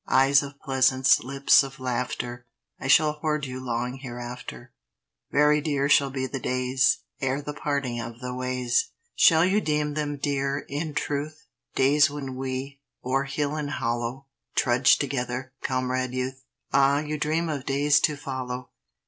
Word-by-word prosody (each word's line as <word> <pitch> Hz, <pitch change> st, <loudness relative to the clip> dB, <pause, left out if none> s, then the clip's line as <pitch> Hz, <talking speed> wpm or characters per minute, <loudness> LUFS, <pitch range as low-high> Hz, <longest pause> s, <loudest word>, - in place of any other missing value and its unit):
Eyes 135 Hz, +1 st, +5 dB
of 140 Hz, 0 st, -9 dB
pleasance, 130 Hz, 0 st, +3 dB
lips 135 Hz, +2 st, +4 dB
of 135 Hz, -1 st, -7 dB
laughter, 120 Hz, -1 st, -3 dB, 0.3 s
I -, -, -5 dB
shall 150 Hz, +2 st, +5 dB
hoard 150 Hz, -1 st, -2 dB
you 130 Hz, -1 st, -6 dB
long 125 Hz, +1 st, -3 dB
hereafter; 120 Hz, -, -8 dB, 0.6 s
Very 150 Hz, +1 st, +4 dB
dear 140 Hz, -2 st, 0 dB
shall 140 Hz, -1 st, +5 dB
be 130 Hz, 0 st, -3 dB
the 135 Hz, +1 st, -4 dB
days 130 Hz, +1 st, +1 dB, 0.2 s
Ere 135 Hz, 0 st, 0 dB
the 145 Hz, 0 st, -6 dB
parting 140 Hz, -5 st, -2 dB
of 115 Hz, 0 st, -8 dB
the 125 Hz, 0 st, -5 dB
ways! 125 Hz, -1 st, 0 dB, 0.2 s
Shall 160 Hz, +1 st, +5 dB
you 200 Hz, +3 st, +2 dB
deem 150 Hz, -2 st, 0 dB
them 145 Hz, -1 st, -2 dB
dear, 140 Hz, 0 st, -1 dB
in 150 Hz, +1 st, -4 dB
truth, 150 Hz, +2 st, -3 dB, 0.3 s
Days 140 Hz, +2 st, +4 dB
when 140 Hz, -3 st, -6 dB
we, 135 Hz, +1 st, -5 dB, 0.2 s
o'er 135 Hz, +2 st, +1 dB
hill 145 Hz, +1 st, -2 dB
and 150 Hz, -2 st, -3 dB
hollow, 120 Hz, +3 st, -3 dB, 0.3 s
Trudged 125 Hz, 0 st, +4 dB
together, 130 Hz, -1 st, -3 dB
Comrade 130 Hz, -1 st, -1 dB
Youth? 130 Hz, +1 st, -4 dB, 0.3 s
Ah, 140 Hz, +1 st, +4 dB
you 150 Hz, 0 st, -4 dB
dream 160 Hz, +3 st, 0 dB
of 145 Hz, -4 st, -4 dB
days 145 Hz, +2 st, +3 dB
to 150 Hz, -, +1 dB
follow! 130 Hz, -2 st, -5 dB
135 Hz, 155 wpm, -26 LUFS, 130-145 Hz, 0.6 s, Eyes